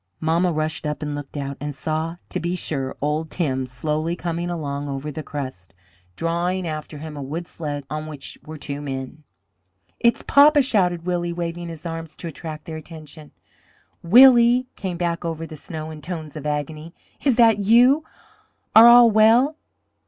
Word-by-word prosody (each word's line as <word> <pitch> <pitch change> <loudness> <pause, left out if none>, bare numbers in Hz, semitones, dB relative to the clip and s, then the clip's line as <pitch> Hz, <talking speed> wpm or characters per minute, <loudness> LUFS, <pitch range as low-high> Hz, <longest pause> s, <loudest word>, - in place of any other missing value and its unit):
Mamma 170 +3 +1
rushed 155 -1 -2
up 150 +1 -4
and 150 -1 -3
looked 145 0 -7
out, 140 -1 -4
and 145 -1 -5
saw 160 +2 -3
to - - -3
be 175 +1 -2
sure 135 -7 -3
old 150 +2 -1
Tim 130 -6 -2
slowly 155 +6 -2
coming 170 0 -3
along 145 -4 -4
over 140 +2 -4
the 155 - -6
crust, 130 - -7 0.4
drawing 175 - -1
after 155 -1 -6
him 155 +1 -8
a 145 - -6
wood 155 +6 -5
sled 145 -4 -5
on 155 +1 -5
which 145 -3 -8
were 155 0 -9
two 145 0 -6
men. 135 +1 -6 0.8
"It's 235 0 +2
papa!" 290 0 +6
shouted 180 -9 +1
Willie, 175 -1 -1
waving 170 0 -4
his 165 0 -9
arms 165 -1 -6
to 170 - -6
attract 155 -1 -8
their 160 -1 -6
attention. 155 -1 -11 0.7
"Willie!" 240 +5 +7
came 185 -3 -4
back 170 -1 -2
over 165 -1 -4
the 160 - -9
snow 155 +1 -7
in 155 -1 -10
tones 160 -2 -6
of 150 -1 -5
agony. 150 +2 -4 0.3
"Is 270 -4 +3
that 225 -3 +5
you? 245 +8 +5 0.7
Are 225 +2 +10
all 240 -1 +8
well?" 230 +7 +5
160 Hz, 170 wpm, -22 LUFS, 150-180 Hz, 0.8 s, Are